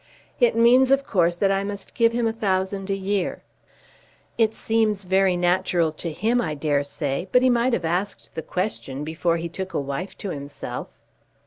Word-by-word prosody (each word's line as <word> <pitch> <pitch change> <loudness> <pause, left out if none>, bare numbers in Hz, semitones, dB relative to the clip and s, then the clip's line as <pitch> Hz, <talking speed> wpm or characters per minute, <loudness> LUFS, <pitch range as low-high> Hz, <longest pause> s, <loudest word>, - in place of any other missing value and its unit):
It 240 -3 +4
means, 245 +3 +5
of 275 0 +3
course, 175 -3 +2
that 195 +2 +2
I 195 0 +1
must 200 -1 -6
give 230 -1 +3
him 235 0 0
a 225 - +1
thousand 195 -2 -1
a 195 - +1
year. 195 -1 -2 0.9
It 220 -1 +2
seems 215 -3 0
very 190 0 +3
natural 175 -2 +2
to 160 +2 -5
him, 230 +9 +1
I 155 -7 -2
dare 145 -1 +1
say, 145 +4 -3
but 250 - +5
he 255 - +5
might 240 +1 +2
have 180 -7 0
asked 180 +5 -3
the 160 - -4
question 160 -8 -3
before 165 +2 0
he 170 +1 -3
took 190 +3 -6
a - - +2
wife 140 +7 -4
to 200 - -5
himself." 145 -1 -6
190 Hz, 190 wpm, -24 LUFS, 170-220 Hz, 0.9 s, means